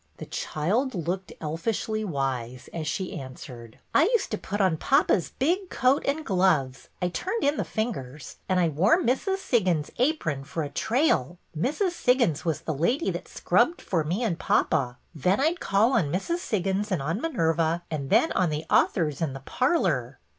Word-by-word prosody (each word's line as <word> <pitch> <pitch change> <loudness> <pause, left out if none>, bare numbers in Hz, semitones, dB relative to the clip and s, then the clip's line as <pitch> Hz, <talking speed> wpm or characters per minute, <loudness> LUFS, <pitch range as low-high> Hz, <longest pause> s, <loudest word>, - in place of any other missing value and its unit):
The - - -7
child 215 - -1
looked 180 +2 -3
elfishly 215 +7 -2
wise 130 - -3
as 160 -2 -4
she 185 +4 -2
answered: 125 -3 -10 0.2
I 310 - +5
used 455 0 +1
to 215 - -1
put 205 +2 -4
on 185 -5 +3
papa's 270 - +2
big 355 +7 0
coat 260 +2 +2
and 295 +2 -1
gloves, 165 -9 +1
— - - -38
I 180 - +2
turned 380 - -3
in 285 +1 +2
the - - 0
fingers, 150 - -4
— - - -39
and 185 -1 +3
I 175 - +3
wore 180 - +3
Mrs. 365 - 0
Siggins's 185 - 0
apron 240 - 0
for 160 +3 -4
a 145 - -4
trail. 200 - +1 0.2
Mrs. 300 - 0
Siggins 250 - +2
was 165 -5 -1
the 160 - -3
lady 235 - +1
that - - -6
scrubbed 345 - +1
for 165 -4 -1
me 180 +10 -1
and 180 -8 -1
papa. 125 -5 +1 0.2
Then 180 +5 +1
I 305 +4 +3
'd 350 - -7
call 215 +6 +2
on 150 - +2
Mrs. 335 - -1
Siggins 200 - -1
and 175 -7 0
on 165 - -2
Minerva, 165 - 0
and 140 -4 -3
then 240 +10 +4
on 180 -2 +2
the 150 +1 -3
authors 150 -4 +2
in 155 -5 -1
the 135 - -8
parlor." 145 - 0
180 Hz, 185 wpm, -26 LUFS, 150-250 Hz, 0.2 s, I